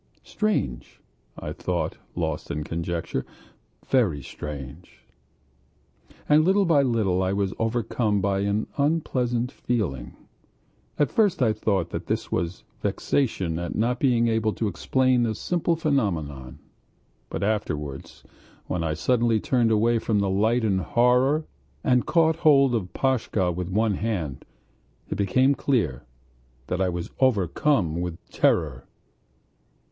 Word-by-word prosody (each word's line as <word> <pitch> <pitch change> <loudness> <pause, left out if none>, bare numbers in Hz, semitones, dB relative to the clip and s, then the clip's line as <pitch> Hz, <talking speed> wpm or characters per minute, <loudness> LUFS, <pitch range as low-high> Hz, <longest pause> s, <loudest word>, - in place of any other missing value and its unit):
"Strange," 125 - -2 0.4
I - - -5
thought, - - -2 0.2
lost 80 -3 -3
in 75 - -3
conjecture. 85 +1 -3 0.6
"Very 95 - +2
strange." 75 +4 -9 1.2
And 150 +1 +5
little 195 +3 +3
by 160 -5 +4
little 110 -8 +1
I 95 +1 0
was 100 -1 -1
overcome 115 -2 0
by 100 0 0
an 100 +2 0
unpleasant 130 -5 0
feeling. 70 - -3 0.8
At 145 - +2
first 205 - +2
I 110 -3 +3
thought 100 -5 -1
that - - -5
this - - -2
was 85 +1 -2 0.2
vexation 95 - -1
at 85 - -4
not 120 +3 0
being 120 -4 +3
able 110 -1 +1
to 110 - -2
explain 125 +5 +1
a 110 - -2
simple 170 - 0
phenomenon; 85 - -1 0.7
but - - -3
afterwards, 75 -10 -3 0.4
when 90 -2 -2
I 80 -1 -1
suddenly 120 +2 +2
turned 120 0 +2
away 115 +2 +3
from 110 -1 0
the 100 -1 +1
light 110 +5 +2
in 100 -4 +2
horror 125 - +2 0.4
and 125 -1 +2
caught 160 -1 +3
hold 140 -6 +5
of 95 -6 -2
Pashka 115 -8 0
with 90 +1 -4
one 105 +2 +1
hand, 90 -10 -3 0.6
it - - -2
became 130 +8 +3
clear 105 - -1 0.6
that 90 +5 -2
I 95 - +2
was 85 -1 -4
overcome 100 - +2
with 90 -2 -4
terror.... - - +1
110 Hz, 130 wpm, -25 LUFS, 90-130 Hz, 1.2 s, And